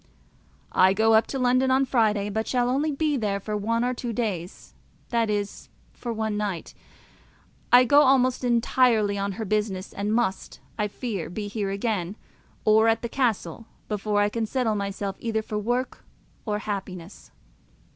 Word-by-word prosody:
I 185 +1 +5
go 220 +2 +3
up 220 +1 +4
to 270 - -4
London 255 +1 +2
on 265 +1 +3
Friday, 210 -5 +1
but 220 +2 -2
shall 245 -1 +1
only 290 +4 +1
be 295 0 0
there 205 -4 -1
for 210 +2 -4
one 230 +3 0
or 250 - 0
two 240 -1 -4
days, 195 -7 -4 0.4
that 230 -2 +1
is, 205 -1 -3 0.2
for 240 - -5
one 220 -1 -2
night. 200 -5 -3 1.0
I 245 +1 +8
go 285 +4 +6
almost 260 -2 +3
entirely 235 -3 +2
on 200 0 -2
her 220 +2 -5
business, 205 -2 -2
and 205 +1 -2
must, 220 -4 -1 0.2
I 210 -1 -1
fear, 205 -4 -5
be 205 +4 -5
here 205 -1 -3
again, 200 -2 -2 0.5
or 220 +1 +5
at 225 +1 +2
the 235 - -3
castle, 225 - -1 0.2
before 210 0 0
I 205 - +2
can 225 +1 -2
settle 245 -2 0
myself 200 -1 -3
either 220 -2 -2
for 210 0 -3
work 245 +4 -2 0.4
or 210 -1 0
happiness. 195 -3 -6
220 Hz, 165 wpm, -25 LUFS, 205-245 Hz, 1.0 s, I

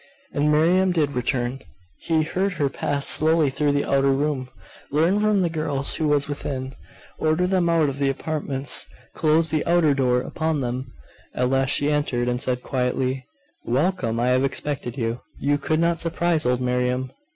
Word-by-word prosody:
And 150 +1 +1
Miriam 180 +5 +3
did 155 -5 +1
return. 125 0 -2 0.4
He 160 -1 +1
heard 190 +5 -1
her 145 -5 0
pass 140 +1 -2
slowly 155 -2 +4
through 145 +1 +1
the 145 - 0
outer 135 0 +2
room, 135 -2 -1 0.4
learn 165 +8 +2
from 210 -2 +2
the - - +2
girls 145 -4 -1
who 155 - 0
was 145 -1 +1
within, 135 -2 -4 0.5
order 160 +3 +1
them 180 -2 +1
out 165 -3 +3
of 140 0 -4
the 140 -1 +2
apartments, 140 -1 0 0.3
close 160 0 +2
the 155 -1 0
outer 170 -4 +3
door 125 -2 +1
upon 155 +2 -2
them; 125 +1 -4 0.4
at 125 +1 0
last 135 0 +1
she 145 +1 +2
entered, 130 -5 0
and 125 0 -1
said 125 -2 -1
quietly 130 0 -2 0.4
'Welcome! 130 -3 0
I 120 +1 +1
have 130 +1 +2
expected 135 -2 -3
you. 115 -1 -2 0.2
You 145 +1 +1
could 155 +2 0
not 170 0 +1
surprise 165 -3 +1
old 125 0 +1
Miriam. 125 +1 -1
145 Hz, 175 wpm, -23 LUFS, 130-160 Hz, 0.5 s, slowly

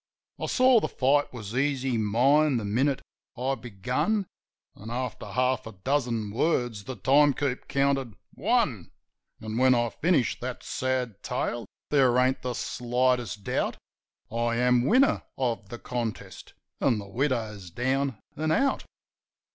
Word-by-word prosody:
I - - -2
saw 255 -2 +5
the - - -1
fight 145 +2 +2
was 110 -2 -7
easy 135 -2 +1
mine 130 +7 +3
the 110 - -3
minute 130 +7 +1 0.3
I 130 +3 0
begun; 125 - -1 0.5
An', 110 - -10
after 125 +2 -4
half 130 -1 0
a 110 - -8
dozen 115 0 -1
words, 120 -5 0
the 130 - -5
time 140 +7 +4
keep 135 -3 -2
counted 140 -5 0 0.2
"One." - - 0 0.5
An' 110 +1 -4
when 130 0 +5
I 120 -1 +1
finish 165 -7 +1
that 125 0 -5
sad 125 -5 -2
tale 120 -3 -3 0.2
there 130 -4 +4
ain't 130 +1 +2
the 125 -1 -3
slightest 125 -4 0
doubt - - -1 0.5
I 115 +1 0
am 125 0 +3
winner 260 +4 +4 0.2
of 115 -6 -2
the 120 - -6
contest, 110 -7 -5 0.2
an' 115 - +2
the 100 -1 -6
widow's 110 -5 -2
down 130 +5 -1 0.2
an' 155 +1 -1
out. 275 +8 +2
125 Hz, 140 wpm, -27 LUFS, 115-135 Hz, 0.5 s, saw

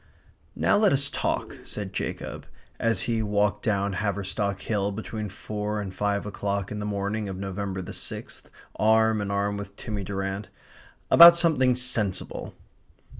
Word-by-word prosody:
"Now - - +3
let 210 -2 +4
us 140 +1 +3
talk," - - -2
said 100 -2 -5
Jacob, - - -5 0.3
as 115 0 +2
he 115 -2 0
walked 105 0 +1
down 100 -2 0
Haverstock 100 0 -2
Hill 100 -2 -1
between 110 0 -5
four 105 +2 -4
and 100 -2 -5
five 100 +1 -1
o'clock 100 -1 -3
in 105 - -4
the 105 - -3
morning 100 +1 -2
of 95 - -5
November 95 0 -4
the - - -8
sixth - - -6 0.3
arm 110 +1 +3
in 100 - -3
arm 100 0 0
with 100 - -8
Timmy 105 -3 -5
Durrant, 95 +1 -4 0.6
"about 170 0 +10
something 140 -7 +3
sensible." 120 -6 -2
105 Hz, 150 wpm, -26 LUFS, 100-110 Hz, 0.6 s, about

